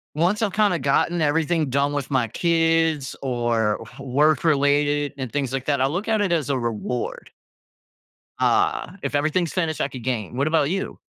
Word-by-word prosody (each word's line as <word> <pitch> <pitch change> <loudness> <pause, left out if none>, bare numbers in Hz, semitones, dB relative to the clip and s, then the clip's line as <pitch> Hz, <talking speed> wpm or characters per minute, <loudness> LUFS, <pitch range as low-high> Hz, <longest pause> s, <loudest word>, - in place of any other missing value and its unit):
once 175 +8 +1
I’ve 215 -3 +1
kinda 205 -3 +2
gotten 155 +5 +1
everything 155 0 +1
done 140 +2 +1
with 145 -2 -3
my 125 -4 +2
kids 165 -1 +1
or 120 -4 0 0.2
work-related 145 +1 +2
and 130 -4 -5
things 135 -3 -2
like 135 -1 -3
that, 145 -1 +1
I 130 - +3
look 180 +10 -2
at 220 - +2
it 200 -4 +1
as 155 -5 -1
a 135 -2 +1
reward. 120 +1 -4 1.1
Uh, - - +1
if - - -3
everything's 155 +3 0
finished, 165 -4 -1
I - - +1
could 130 -4 -9
game. 120 -3 -3
What 140 +3 +1
about 155 -3 +2
you? 195 +2 -3
145 Hz, 175 wpm, -23 LUFS, 130-165 Hz, 1.1 s, I